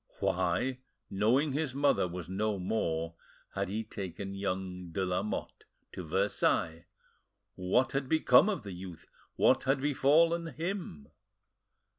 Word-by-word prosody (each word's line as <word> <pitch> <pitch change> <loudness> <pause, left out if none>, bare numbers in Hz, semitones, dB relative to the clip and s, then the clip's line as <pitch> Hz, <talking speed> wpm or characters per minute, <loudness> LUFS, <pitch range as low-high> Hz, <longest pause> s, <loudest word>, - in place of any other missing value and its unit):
Why, 130 0 0 0.3
knowing 125 +9 +2
his 145 -2 -2
mother 140 -9 +3
was 90 -1 -6
no 100 +3 -1
more, 85 -4 -1 0.4
had - - -2
he 110 +3 -2
taken 95 -2 -6
young 95 -2 -4
de 95 +3 -1
Lamotte 90 +3 -3 0.3
to 90 - -7
Versailles? 85 -2 0 0.7
What 95 +8 +1
had 135 -1 -2
become 160 +2 +5
of 195 -7 -2
the 100 - -7
youth? 90 -2 -9 0.3
What - - +3
had 135 +1 +2
befallen, 155 +4 +3
him? 165 - -4
100 Hz, 125 wpm, -31 LUFS, 90-140 Hz, 0.7 s, become